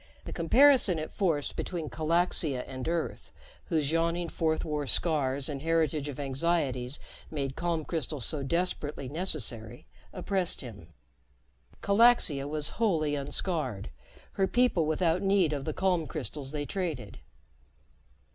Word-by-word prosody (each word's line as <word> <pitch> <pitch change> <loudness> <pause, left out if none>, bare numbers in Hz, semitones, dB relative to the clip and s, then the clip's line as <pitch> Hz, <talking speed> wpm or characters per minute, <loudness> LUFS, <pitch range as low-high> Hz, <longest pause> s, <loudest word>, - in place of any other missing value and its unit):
The - - -6
comparison 240 - +5
it 155 0 -4
forced 165 -7 0
between 170 -4 -3
Calaxia 160 -4 +2
and 130 +1 -6
Earth, 170 0 -3 0.3
whose 155 -4 0
yawning 170 +1 0
Fourth 160 -1 0
War 150 -3 -2
scars 140 -1 +1
and 140 -3 -4
heritage 155 -2 +1
of 145 - -7
anxieties 135 -2 -1 0.3
made 140 -3 -3
calm 170 -3 -1
crystals 150 -6 -3
so 150 +2 0
desperately 150 -2 -1
necessary, 125 - -4 0.3
oppressed 190 -3 0
him. 110 - -10 1.0
Calaxia 200 - +4
was 150 0 -1
wholly 160 -9 +2
unscarred, 145 - -2 0.4
her 195 -1 +1
people 240 -10 +2
without 165 +2 +1
need 195 -5 +3
of 140 -2 -3
the 155 - -1
calm 180 -2 +1
crystals 145 -2 -5
they 150 -1 -3
traded. 180 -3 -4
155 Hz, 130 wpm, -29 LUFS, 140-175 Hz, 1.0 s, comparison